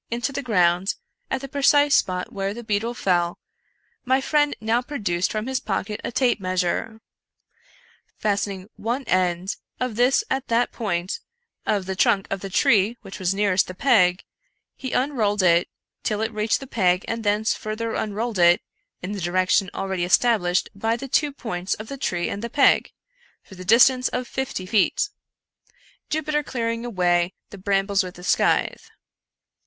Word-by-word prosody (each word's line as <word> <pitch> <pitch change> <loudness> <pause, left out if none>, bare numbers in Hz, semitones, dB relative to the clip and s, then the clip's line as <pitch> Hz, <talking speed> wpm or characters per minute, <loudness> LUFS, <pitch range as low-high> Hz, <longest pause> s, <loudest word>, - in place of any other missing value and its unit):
into 235 +3 -2
the 280 +1 -3
ground, 180 -6 +2 0.3
at 265 - -2
the 275 - -6
precise 285 +1 +3
spot 180 -6 +1
where 195 +1 -2
the 240 - -7
beetle 220 +2 -1
fell, 175 -5 +1 0.7
my 260 +1 +2
friend 295 +1 +1
now 225 +2 +1
produced 205 -10 -2
from 215 0 -2
his 260 0 -1
pocket 210 -1 -3
a - - -3
tape 245 -1 +2
measure. 185 +4 -1 1.2
Fastening 200 -2 -2
one 240 +5 -2
end 185 -2 0 0.2
of 255 -4 -2
this 250 +3 +3
at 265 0 -2
that 235 +1 +1
point 180 -5 -2 0.5
of 205 -3 +1
the 190 0 -3
trunk 195 0 +3
of 195 - -1
the 195 - -5
tree 210 +4 +3
which 195 - -9
was 185 0 0
nearest 200 -2 +2
the 185 - -8
peg, 180 -7 +3 0.5
he 260 -2 -6
unrolled 220 -7 +1
it 170 -1 +4 0.3
till 210 0 -1
it 225 +1 -2
reached 215 +3 0
the - - -6
peg 185 -7 +1
and 230 0 -3
thence 210 +1 +1
fur 215 0 -5
ther 230 0 -3
imrolled 215 0 -2
it 175 0 +6 0.4
in 185 - -4
the 205 -2 -4
direction 185 +2 +2
already 190 -2 -2
established 180 -1 +2
by 225 +3 0
the 275 - -7
two 295 +3 +1
points 195 -9 -3
of 215 +1 -9
the 275 - -5
tree 175 -9 -1
and 200 - -4
the 235 - -3
peg, 275 - +3 0.5
for - - -15
the 185 -1 -9
distance 250 +5 +5
of 250 - -3
fifty 265 -8 -4
feet 205 0 +2 0.5
— - - -33
Jupiter 305 -1 0
clearing 230 -4 -3
away 180 -5 +1 0.2
the 200 - -10
brambles 195 +1 +1
with 180 -1 -6
the 180 - -12
scNthe. - - +1
210 Hz, 170 wpm, -23 LUFS, 185-245 Hz, 1.2 s, it